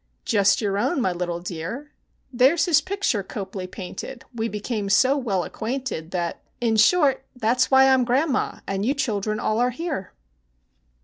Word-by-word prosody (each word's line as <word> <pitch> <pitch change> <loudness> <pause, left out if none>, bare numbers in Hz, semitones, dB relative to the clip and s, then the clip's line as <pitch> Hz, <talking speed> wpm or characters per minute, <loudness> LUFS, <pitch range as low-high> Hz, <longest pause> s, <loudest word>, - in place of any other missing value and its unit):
Just 200 -1 +3
your 200 -2 0
own, 290 +8 0
my 190 -7 +1
little 175 -1 -3
dear, 180 - -6 0.4
There's 265 +7 +4
his 340 -5 +4
picture 390 - -1
Copley 190 -1 -6
painted: 190 +7 -8
we 225 -1 -2
became 210 -1 -3
so 255 +8 +4
well 210 -10 -1
acquainted, 230 -6 -4
That 175 -2 -3 0.2
in 230 -2 +1
short, 275 +3 +4
that's 250 +1 +1
why 265 0 +6
I 265 - +6
'm 260 -1 +3
grandma, 260 +3 0
and 195 0 -2
you 265 +6 +1
children 215 -5 -1
all 215 +1 0
are 245 +1 +3
here! 275 - -5
230 Hz, 165 wpm, -23 LUFS, 195-265 Hz, 0.4 s, why